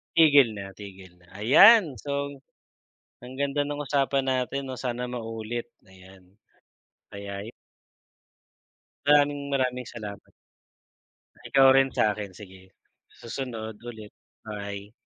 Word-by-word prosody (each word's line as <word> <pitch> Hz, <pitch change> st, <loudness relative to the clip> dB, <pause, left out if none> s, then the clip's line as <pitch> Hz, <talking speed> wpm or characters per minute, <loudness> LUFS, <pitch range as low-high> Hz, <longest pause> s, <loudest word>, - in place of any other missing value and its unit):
Tigil 145 Hz, -6 st, +6 dB
na 100 Hz, -1 st, -7 dB
tigil 95 Hz, -2 st, -13 dB
na, 90 Hz, -, -24 dB, 0.2 s
ayan! 165 Hz, -, +7 dB
So, 140 Hz, +1 st, -3 dB, 0.9 s
ang 125 Hz, +1 st, -10 dB
ganda 140 Hz, +1 st, 0 dB
ng 145 Hz, 0 st, -4 dB
usapan 135 Hz, -1 st, +1 dB
natin 130 Hz, +1 st, -1 dB
'no, 130 Hz, -, -5 dB
sana 125 Hz, -1 st, -4 dB
maulit 115 Hz, 0 st, -5 dB, 0.2 s
ayan. 95 Hz, 0 st, -18 dB, 0.7 s
Kaya 100 Hz, +1 st, -7 dB, 1.6 s
Maraming, 145 Hz, -1 st, +3 dB
maraming 125 Hz, -2 st, 0 dB
salamat! 105 Hz, -4 st, -8 dB, 1.3 s
Ikaw 135 Hz, -1 st, +6 dB
rin 135 Hz, 0 st, +4 dB
sa'kin 105 Hz, -3 st, -1 dB
sige, 95 Hz, -1 st, -14 dB, 0.5 s
susunod 115 Hz, -3 st, -6 dB
ulit, 110 Hz, -3 st, -10 dB, 0.3 s
bye. 100 Hz, -1 st, -7 dB
120 Hz, 105 wpm, -26 LUFS, 100-135 Hz, 1.6 s, ayan